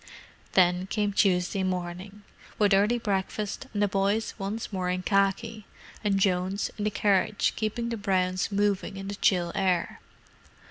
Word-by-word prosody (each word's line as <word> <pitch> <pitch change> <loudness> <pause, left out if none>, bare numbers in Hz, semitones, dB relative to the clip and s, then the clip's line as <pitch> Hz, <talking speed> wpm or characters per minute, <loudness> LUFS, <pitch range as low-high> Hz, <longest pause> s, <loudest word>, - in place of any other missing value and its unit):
Then 180 0 +3
came 205 0 -1
Tuesday 190 0 +2
morning: 185 +2 -4 0.3
with 205 -1 +3
early 205 +5 +3
breakfast, 205 +2 -3
and 205 -1 0
the - - +3
boys 200 +3 0
once 205 +2 -4
more 185 -1 -1
in 180 0 -2
khaki, 200 +3 0 0.4
and 200 -2 +2
Jones, 190 +1 0
in 205 - -1
the - - +2
carriage, 205 0 +1
keeping 230 +2 -2
the 230 - -3
browns 185 -2 0
moving 200 -1 0
in 195 0 -6
the - - -3
chill 175 -3 +2
air. 185 -3 0
195 Hz, 150 wpm, -27 LUFS, 185-210 Hz, 0.4 s, Then